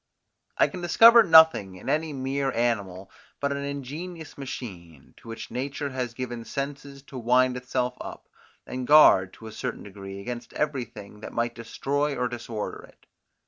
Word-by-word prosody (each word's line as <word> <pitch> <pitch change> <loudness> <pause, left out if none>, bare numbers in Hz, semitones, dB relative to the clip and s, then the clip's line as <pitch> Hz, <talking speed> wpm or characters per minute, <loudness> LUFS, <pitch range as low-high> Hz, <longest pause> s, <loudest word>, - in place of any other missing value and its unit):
I - - +5
can 180 - -8
discover 230 +7 +8
nothing 160 - +6
in 90 - -12
any 155 +1 0
mere 135 0 -2
animal 100 -6 -1 0.3
but 140 0 -1
an 140 - -2
ingenious 145 +4 -6
machine, 90 - -9
to 120 - -17
which 115 0 -7
nature 140 +2 -3
has 125 -3 -4
given 120 -2 -5
senses 140 +1 -6
to 135 -2 -9
wind 125 +2 +3
itself 125 0 -2
up, - - -9 0.4
and 125 -1 -5
guard, 100 -11 +7
to 115 - -13
a 110 - -7
certain 125 +2 -5
degree, 100 -1 -9
against 120 +3 -7
everything 120 -8 -4
that - - -9
might 120 0 -1
destroy 140 +5 -2
or 125 -1 0
disorder 115 -3 -6
it. - - -24
125 Hz, 160 wpm, -26 LUFS, 115-140 Hz, 0.4 s, discover